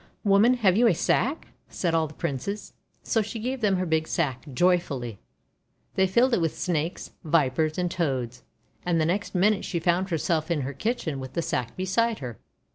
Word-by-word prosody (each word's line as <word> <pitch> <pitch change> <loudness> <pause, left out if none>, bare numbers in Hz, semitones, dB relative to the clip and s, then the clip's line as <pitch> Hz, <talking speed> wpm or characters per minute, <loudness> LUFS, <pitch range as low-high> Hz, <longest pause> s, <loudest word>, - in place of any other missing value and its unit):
'Woman, 210 +5 +5
have 200 -7 +3
you 235 +3 +5
a 195 - +4
sack?' 275 - 0 0.2
said 170 -3 -1
all 160 -1 +2
the 155 - -13
Princes. 170 +7 -4 0.3
So 225 - +1
she 220 +2 -5
gave 250 +3 -3
them 205 -3 +3
her 185 0 0
big 160 -1 0
sack, 135 -7 -1
joyfully. 140 - +1 0.7
They 190 0 +3
filled 240 +7 +3
it 200 - +3
with 165 -2 -1
Snakes, 165 -1 -2
Vipers, 155 -1 +1
and 180 -1 0
Toads. 130 -8 -2 0.4
And 175 -2 +1
the 155 - +2
next 190 +4 -1
minute 200 +3 +3
she 170 - -2
found 175 +3 +1
herself 165 -1 0
in 165 -4 +1
her 135 +2 -4
kitchen 160 - -2
with 130 -1 -7
the 170 - -1
sack 125 -6 -2
beside 210 +5 +1
her. 120 -5 -7
175 Hz, 190 wpm, -26 LUFS, 150-200 Hz, 0.7 s, Woman